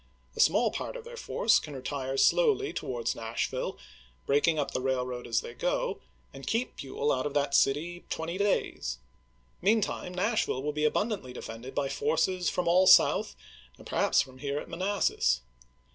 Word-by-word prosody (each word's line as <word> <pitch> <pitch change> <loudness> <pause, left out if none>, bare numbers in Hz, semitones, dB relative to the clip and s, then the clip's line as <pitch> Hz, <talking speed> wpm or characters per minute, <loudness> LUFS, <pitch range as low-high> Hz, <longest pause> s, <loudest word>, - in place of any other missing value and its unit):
A - - -10
small - - +4
part - - -5
of - - -9
their 480 +1 -10
force 470 - +2
can 150 -2 -8
retire 135 0 -4
slowly 425 - +3
towards 120 -2 -2
Nashville, 115 0 -3 0.5
break 145 +3 +2
ing 165 -1 +3
up 145 - -1
the 130 - -2
railroad 125 -2 -2
as - - +1
they 470 0 -8
go, - - -1 0.3
and - - -10
keep 235 +3 -1
Buell 140 +2 -2
out 130 +2 0
of 145 - -7
that 140 -1 +1
city 160 +6 +2
twenty 170 +3 -3
days. 205 0 0 0.6
Meantime 195 -2 0
NashviUe 200 - 0
will 150 0 -1
be 150 0 +2
abun 215 +8 0
dantly 130 -11 -7
defended 115 +3 -8
by 140 -1 0
forces 185 - 0
from 180 - -2
all 185 +2 +5
South - - +6 0.4
and - - -15
perhaps - - +2
from 130 0 -15
here 140 +1 -2
at - - -5
Manassas. 170 - +1
150 Hz, 175 wpm, -29 LUFS, 130-205 Hz, 0.6 s, South